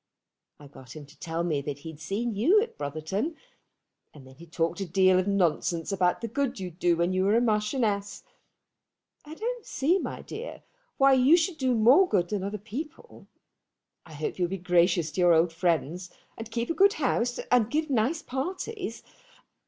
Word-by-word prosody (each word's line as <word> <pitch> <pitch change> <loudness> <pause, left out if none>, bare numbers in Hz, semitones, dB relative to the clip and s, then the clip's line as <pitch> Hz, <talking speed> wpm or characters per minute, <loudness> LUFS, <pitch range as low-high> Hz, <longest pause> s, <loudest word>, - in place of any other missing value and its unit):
I 145 - -13
got 130 -2 -13
him 150 -2 -9
to 145 +2 -20
tell 165 -1 -3
me 155 -5 -1
that 140 0 -5
he'd 160 0 -10
seen 215 +8 -3
you 275 - +4
at 460 +2 -3
Brotherton, 160 - -3 0.8
and 140 -3 -13
then 130 - -15
he 170 +6 -14
talked 165 +2 -2
a - - -1
deal 185 +1 +4
of 185 - -1
nonsense 175 -3 0
about 185 -1 +1
the 230 - -3
good 265 0 -2
you'd 180 -2 -7
do 175 -1 +2
when 170 +2 +1
you 185 0 +1
were 205 +4 +3
Marchioness. 210 -2 -1 1.0
I 305 +1 -9
don't 475 +4 -4
see, 335 +5 +1
my - - -6
dear, 480 +3 -8 0.3
why 275 0 +5
you 265 +6 +5
should 330 -1 -1
do 260 -2 +1
more 260 - +5
good 175 -1 +1
than 205 -3 -2
other 200 +2 -3
people. 260 +10 -9 0.8
I 160 - -14
hope 155 +4 -4
you'll 175 - +2
be 195 +2 -4
gracious 175 -2 +2
to 185 - -2
your 175 -1 +6
old 165 +1 +2
friends, 175 +1 -1 0.3
and 225 0 -8
keep 235 +4 -2
a - - 0
good 395 +3 +4
house, 245 -4 0
and 240 -3 +4
give 310 +1 -1
nice 265 +7 0
parties. 365 - -5
200 Hz, 185 wpm, -27 LUFS, 170-265 Hz, 1.0 s, your